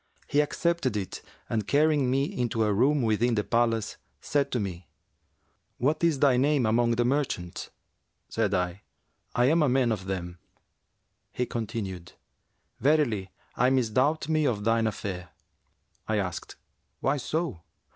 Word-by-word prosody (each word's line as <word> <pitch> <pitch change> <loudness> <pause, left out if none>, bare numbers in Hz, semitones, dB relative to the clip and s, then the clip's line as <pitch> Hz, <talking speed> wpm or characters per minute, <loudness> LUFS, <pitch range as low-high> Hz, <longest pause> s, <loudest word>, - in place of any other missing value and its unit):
He 145 - +1
accepted 150 -5 0
it 95 -2 -5 0.3
and 110 -3 -2
carrying 145 -2 +3
me 135 +2 +2
into 120 -5 -1
a 105 -1 +2
room 135 +6 +3
within 115 +2 +2
the 105 - +1
palace, 115 -2 0 0.2
said 140 -1 0
to 125 - 0
me, 90 -5 -5 0.9
'What 150 +6 0
is 165 -4 +3
thy 135 -2 +4
name 140 -1 +3
among 115 +2 +2
the 120 +1 +1
merchants?' 125 -10 -2 0.6
Said 110 -3 0
I, 90 +1 -2 0.5
'I 120 0 +4
am 160 +5 +4
a 150 - +3
man 125 -2 +2
of 100 -4 -3
them.'[FN#357] 90 -2 -4 1.0
He 125 - -1
continued, 100 -7 -5 0.7
'Verily 125 -9 +2 0.3
I 125 +2 +3
misdoubt 130 +4 +1
me 155 -2 +2
of 105 -5 -1
thine 115 0 +2
affair.' 95 -4 -4 0.8
I 110 - +1
asked, 90 -4 -4 0.5
'Why 135 +2 +1
so?' 145 - -2
120 Hz, 145 wpm, -27 LUFS, 105-140 Hz, 1.0 s, thy